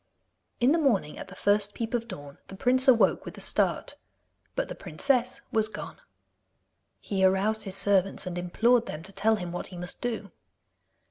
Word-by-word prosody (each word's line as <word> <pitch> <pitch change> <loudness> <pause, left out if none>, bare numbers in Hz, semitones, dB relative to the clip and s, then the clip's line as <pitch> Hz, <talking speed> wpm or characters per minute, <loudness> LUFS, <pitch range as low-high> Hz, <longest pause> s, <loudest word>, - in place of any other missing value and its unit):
In 245 +3 +4
the 330 - +3
morning, 210 - +1
at - - -7
the 195 - -10
first 205 +1 +1
peep 230 0 -4
of 235 -1 -1
dawn, 145 -9 -9
the 195 - -9
prince 255 +6 +3
awoke 225 -7 +5
with - - -9
a - - -8
start. - - 0 0.6
But - - -1
the - - -6
princess 255 -2 0
was 220 -1 +2
gone. 210 -1 -8 1.0
He 195 -2 -2
aroused 195 +4 +2
his 195 -1 -3
servants 195 -1 +2
and 180 -1 -4
implored 225 +7 +2
them 150 +1 -6
to 195 +3 -9
tell 220 +3 +2
him 180 -4 -5
what 175 - -4
he 180 - -10
must 180 0 -6
do. 225 -5 -3
205 Hz, 185 wpm, -28 LUFS, 190-235 Hz, 1.0 s, awoke